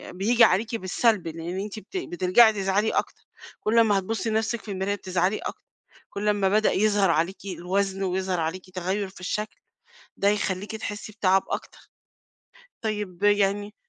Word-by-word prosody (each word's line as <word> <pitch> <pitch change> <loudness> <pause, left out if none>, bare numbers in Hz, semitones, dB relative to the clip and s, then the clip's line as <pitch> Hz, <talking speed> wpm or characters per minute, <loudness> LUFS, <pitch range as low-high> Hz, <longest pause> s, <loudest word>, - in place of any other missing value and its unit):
بييجي 230 +6 +4
عليكِ 220 +3 +3
بالسَلْب 200 -1 +1
لأن 165 +3 -5
أنتِ 210 +2 -5
بت 380 - -8
بترجعي 220 - +4
تزعلي 200 +2 +1
أكتر، - - -2 0.4
كل 225 +2 +2
أمّا 210 -3 +4
هتبُصّي 225 +4 -3
لنَفسِك 220 +1 -1
في 210 - -8
المراية 195 +1 -1
بتزعلي 185 +1 0
أكتر، - - -7 0.4
كُلّ 205 +1 -4
أما 205 -2 +2
بدأ 215 +2 +3
يظهر 205 -1 +3
عليكِ 170 +4 0
الوزن 195 +1 -2
ويظهر 185 -1 -1
عليكِ 170 +3 -3
تغيُّر 190 +2 -2
في 190 - -15
الشكل، 210 +4 -3 0.6
ده 200 - +1
هيخليكِ 205 0 -2
تحسّي 210 0 -6
بتَعَب 190 -2 +2
أكتر، - - -5 1.0
طيب 210 -4 -4
يعني 205 0 +2
200 Hz, 150 wpm, -25 LUFS, 185-215 Hz, 1.0 s, بييجي